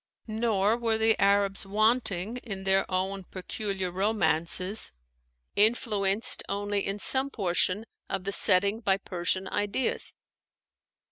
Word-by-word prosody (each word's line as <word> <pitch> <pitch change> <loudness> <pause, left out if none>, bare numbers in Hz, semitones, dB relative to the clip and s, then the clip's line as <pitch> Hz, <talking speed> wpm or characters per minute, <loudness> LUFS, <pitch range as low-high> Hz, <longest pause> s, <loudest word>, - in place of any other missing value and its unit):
Nor 220 -1 0
were 230 -2 0
the 220 0 +3
Arabs 200 0 +2
wanting 215 0 0
in 200 -6 -7
their 195 0 +1
own 190 +1 -2
peculiar 190 0 -4
'Romances,' 185 0 0 0.6
influenced 210 -1 +2
only 205 0 -1
in 195 +1 -3
some 265 +6 +2
portions 195 -1 0 0.2
of 185 - -3
the 200 - -3
setting 200 +2 +5
by 195 -4 +1
Persian 185 0 -2
ideas. 205 +5 -2
200 Hz, 115 wpm, -27 LUFS, 190-220 Hz, 0.6 s, setting